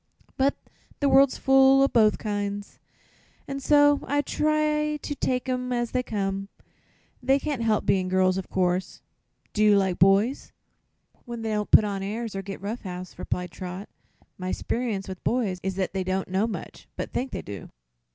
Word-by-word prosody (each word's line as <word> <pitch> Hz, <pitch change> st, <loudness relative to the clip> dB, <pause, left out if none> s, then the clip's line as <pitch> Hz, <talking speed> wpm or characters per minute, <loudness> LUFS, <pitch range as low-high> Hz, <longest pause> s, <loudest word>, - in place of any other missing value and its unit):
But 275 Hz, +1 st, +2 dB, 0.4 s
the 285 Hz, -, +2 dB
world's 270 Hz, 0 st, +5 dB
full 270 Hz, 0 st, +5 dB
o' -, -, +5 dB
both 220 Hz, -5 st, +3 dB
kinds, 205 Hz, -1 st, -4 dB, 0.7 s
and 275 Hz, 0 st, -4 dB
so 290 Hz, +1 st, +5 dB
I 290 Hz, +1 st, +2 dB
try 300 Hz, +1 st, 0 dB
to 290 Hz, -, -5 dB
take 255 Hz, -2 st, -1 dB
'em 250 Hz, -1 st, -2 dB
as 240 Hz, -1 st, -1 dB
they 255 Hz, -, +1 dB
come. 195 Hz, -4 st, -3 dB, 0.7 s
They 265 Hz, +2 st, +3 dB
can't 280 Hz, -3 st, -3 dB
help 220 Hz, -2 st, +1 dB
being 185 Hz, -1 st, +2 dB
girls, 185 Hz, 0 st, +2 dB
of 190 Hz, -1 st, -5 dB
course. 185 Hz, 0 st, -1 dB, 0.5 s
Do 215 Hz, -, +2 dB
you 210 Hz, -1 st, +6 dB
like 190 Hz, -2 st, 0 dB
boys?" 200 Hz, +8 st, +3 dB, 0.7 s
"When 235 Hz, -1 st, -6 dB
they 220 Hz, -, -2 dB
don't 210 Hz, -1 st, -1 dB
put -, -, +7 dB
on 200 Hz, -2 st, -3 dB
airs, 215 Hz, +2 st, -4 dB
or 195 Hz, -, -2 dB
get 195 Hz, 0 st, -7 dB
rough 215 Hz, +5 st, -4 dB
house," 185 Hz, -1 st, -8 dB
replied 180 Hz, -1 st, -3 dB
Trot. 185 Hz, +3 st, -7 dB, 0.5 s
"My 185 Hz, 0 st, -3 dB
'sperience 225 Hz, -5 st, -2 dB
with 190 Hz, -2 st, -8 dB
boys 215 Hz, -7 st, 0 dB
is 190 Hz, 0 st, -3 dB
that 190 Hz, -1 st, -2 dB
they 190 Hz, -1 st, -1 dB
don't 185 Hz, +1 st, -2 dB
know 195 Hz, +4 st, +1 dB
much, 225 Hz, -, -7 dB
but -, -, -5 dB
think 260 Hz, +2 st, -1 dB
they -, -, -5 dB
do." 100 Hz, -1 st, -8 dB
215 Hz, 180 wpm, -26 LUFS, 190-265 Hz, 0.7 s, put